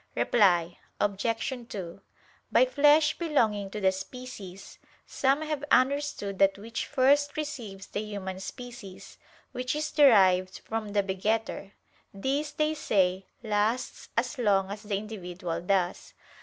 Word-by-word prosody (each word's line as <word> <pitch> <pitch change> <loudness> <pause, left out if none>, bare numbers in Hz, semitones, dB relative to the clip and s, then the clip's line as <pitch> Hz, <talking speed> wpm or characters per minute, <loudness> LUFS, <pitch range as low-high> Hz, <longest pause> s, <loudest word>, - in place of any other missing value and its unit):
Reply 175 -6 +3 0.2
Obj. 230 +4 -1
2: 190 -4 -7 0.5
By - - +6
flesh 300 -6 +4
belonging 220 - +1
to 210 - -5
the 190 -2 +3
species, 195 -2 -9 0.3
some 275 +3 +1
have 305 -2 -3
understood 255 -7 +1
that 195 0 +4
which 225 +3 -5
first 285 +2 +3
receives 235 -11 -5
the - - -5
human 200 -3 -5
species, 200 -3 -9 0.3
which 255 +1 -2
is 305 0 -2
derived 190 -10 +5
from 220 -2 -4
the 205 -1 +2
begetter: 200 +1 -2 0.4
this, 270 +9 -2
they 305 +1 0
say, 190 -9 +1 0.2
lasts 220 +3 -1
as 250 +4 -1
long 195 -4 +2
as 205 +1 -6
the 205 -2 -2
individual 180 -5 -5
does. 180 -1 -1
215 Hz, 130 wpm, -28 LUFS, 195-265 Hz, 0.5 s, By